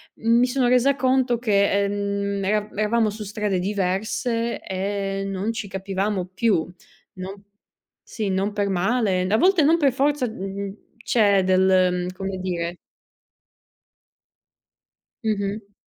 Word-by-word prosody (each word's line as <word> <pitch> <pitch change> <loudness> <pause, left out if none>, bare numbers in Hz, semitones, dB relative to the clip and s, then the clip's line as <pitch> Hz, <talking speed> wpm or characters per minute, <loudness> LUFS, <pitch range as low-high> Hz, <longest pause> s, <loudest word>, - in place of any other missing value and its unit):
mi 235 +2 +3
sono 250 -1 +1
resa 255 +3 +4
conto 255 -2 +2
che, 200 -5 +2
ehm, 200 0 -2
era 210 +1 0
eravamo 215 +2 +1
su 210 +1 -6
strade 210 -2 -1
diverse 210 +5 -1
e 195 +1 -3
non 195 +3 -2
ci 225 -2 -5
capivamo 195 0 -2
più. 200 -5 +2 0.5
Non 195 +2 -8 0.6
sì, 215 -3 -4
non 195 +2 0
per 205 -1 0
male. 195 +1 +1
A 210 +3 +2
volte 365 - +4
non 320 +4 +4
per 280 -4 +4
forza, 275 0 +1
mh - - -9
mhmm, 195 0 -5 0.3
c'è 200 -4 +3
del, 185 -1 +3
mhmm, - - -4
come 190 0 -4
dire 175 -2 -3 2.5
Mh-mh. 205 -1 -2
200 Hz, 130 wpm, -23 LUFS, 195-230 Hz, 2.5 s, resa